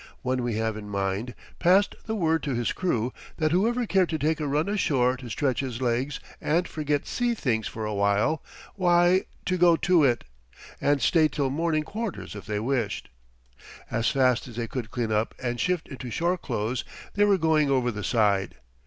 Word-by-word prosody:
One 130 0 0
we 120 -2 -1
have 110 0 -1
in 105 -1 -8
mind 100 +4 -2 0.2
passed 190 +4 +4
the 220 - -1
word 160 -5 +1
to 140 -4 -2
his 120 0 0
crew 125 -10 -1 0.2
that 155 -1 +1
whoever 235 +7 +2
cared 190 -4 +2
to 160 - -1
take 155 +2 0
a 150 - -2
run 150 +4 +1
ashore 135 -11 +2
to 125 -1 -9
stretch 130 0 0
his 125 -4 -3
legs 130 +3 -1 0.2
and 170 +4 +1
forget 150 -2 -1
sea 240 -1 0
things 110 - -1
for 110 -1 -5
a 105 - -2
while, 100 +9 +1 0.3
why 175 0 +3 0.2
to 185 -1 0
go 175 -1 +6
to 175 -1 +3
it. 120 -4 +2 0.6
And 145 -1 +2
stay 160 -3 +4
till 140 -3 -1
morning 155 +1 0
quarters 215 +4 -5
if 100 - -9
they 105 -1 -1
wished. 115 -3 -2 0.8
As 115 0 +1
fast 130 -4 +2
as 120 - -10
they 120 0 -2
could 120 -2 -5
clean 120 -3 -2
up 110 +1 0
and 120 -1 -3
shift 180 -2 0
into 130 -2 -7
shore 170 +9 +1
clothes 120 - -3 0.3
they 205 - +3
were 200 -1 +4
going 155 -3 +2
over 125 -3 +2
the 105 -1 -6
side. 100 -4 +1
135 Hz, 195 wpm, -26 LUFS, 115-170 Hz, 0.8 s, go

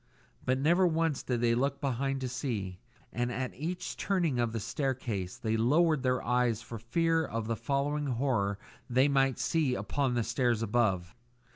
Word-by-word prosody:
But 130 +1 +1
never 170 +7 +4
once 165 -3 0
did 120 -2 -2
they 120 -1 +3
look 135 +3 0
behind 135 0 -1
to 130 - -1
see; 110 -8 -3 0.3
and 120 +1 -1
at 130 +1 -3
each 170 +6 -4
turning 170 -10 0
of 120 -1 +1
the 115 - -3
staircase 115 -7 -3
they 110 -1 -1
lowered 150 +6 +3
their 125 -1 +1
eyes 125 -2 +1
for 115 -2 -8
fear 165 +8 +1
of 115 -6 -3
the 115 +1 -1
following 145 +4 -1
horror 115 -6 0 0.3
they 130 +3 +4
might 135 -2 +2
see 150 -6 +1
upon 135 -2 -1
the 120 - +1
stairs 120 -2 +1
above. 100 -6 +1
125 Hz, 170 wpm, -30 LUFS, 115-140 Hz, 0.3 s, never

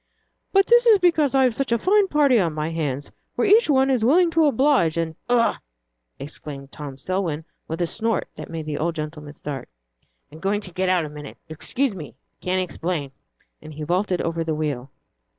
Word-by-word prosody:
"But 390 0 +5
that 480 +1 +5
is 440 -3 +8
because 320 -7 +2
I've 260 -3 +4
such 270 +1 -2
a 235 - +4
fine 395 - +3
party 285 -7 +4
on 170 -5 0
my 155 +1 -2
hands, 145 -4 -3 0.2
where - - +1
each 425 -1 +5
one 270 -1 +4
is 250 -4 +1
willing 335 +8 +4
to 325 -1 +3
oblige, 260 - +3
and 165 -1 -2
" - - -44
"Ugh!" 240 -1 +3 0.6
exclaimed 140 -1 -8
Tom 140 -3 -8
Selwyn, 165 -1 -2 0.2
with 165 +2 -2
a - - +2
snort 225 +3 -1
that - - -8
made 165 -2 -5
the 150 -1 -3
old 165 +1 -1
gentleman 150 -1 -6
start. 140 -3 -6 0.6
"I'm 155 - -12
going 200 +3 0
to 185 - -10
get 185 +1 0
out 180 -3 +2
a - - -7
minute 150 -1 -10
excuse 240 - -1
me 150 - -9 0.2
can't 185 +1 -1
explain." 170 -5 -3 0.5
And 155 -1 -11
he 155 - -6
vaulted 180 +3 0
over 165 0 -1
the 160 -1 -2
wheel. 145 -4 -3
175 Hz, 200 wpm, -23 LUFS, -, 0.6 s, is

